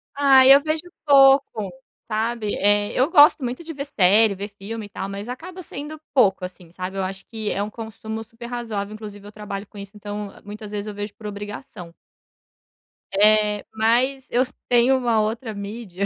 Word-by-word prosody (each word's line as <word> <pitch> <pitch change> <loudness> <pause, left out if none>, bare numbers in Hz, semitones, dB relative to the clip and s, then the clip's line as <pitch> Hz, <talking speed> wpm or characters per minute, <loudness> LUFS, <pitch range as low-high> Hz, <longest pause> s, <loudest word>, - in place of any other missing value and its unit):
Ah, 275 -2 +6
eu 275 +2 +8
vejo 310 +1 -1 0.2
pouco, 270 -7 +5 0.4
sabe? 220 -1 -1
Eh, 205 +1 +2
eu 260 +4 +2
gosto 295 -2 +7
muito 250 +7 -4
de 325 0 -7
ver 280 0 -5
série, 210 -3 +4
ver 200 +2 -6
filme 205 +2 -7
e - - -13
tal, 195 - -5
mas 200 +4 -6
acaba 360 +8 -8
sendo 300 0 -8
pouco 200 -8 +3
assim, 180 -1 -8
sabe? 185 +2 -6
Eu 195 - 0
acho 190 +1 -6
que 220 -2 -4
é 205 +1 -1
consumo 220 0 -7
super 230 +2 -12
razoável. 220 -4 -4
Inclusive, 210 -2 -9
eu 205 - -10
trabalho 210 -1 -6
com - - -16
isso, 200 +1 -9
então, 205 0 -6
muitas 210 0 -9
vezes, 210 0 -4
eu 210 - -5
vejo 205 0 -6
por 215 -3 -9
obrigação. 205 -4 -8 1.3
Eh, 210 0 +4
mas 245 +5 +1
eu 245 +2 +3 0.3
tenho 245 +2 +4
uma 235 -3 +1
outra 220 +2 -2
mídia 200 -2 -5
215 Hz, 180 wpm, -22 LUFS, 205-250 Hz, 1.3 s, eu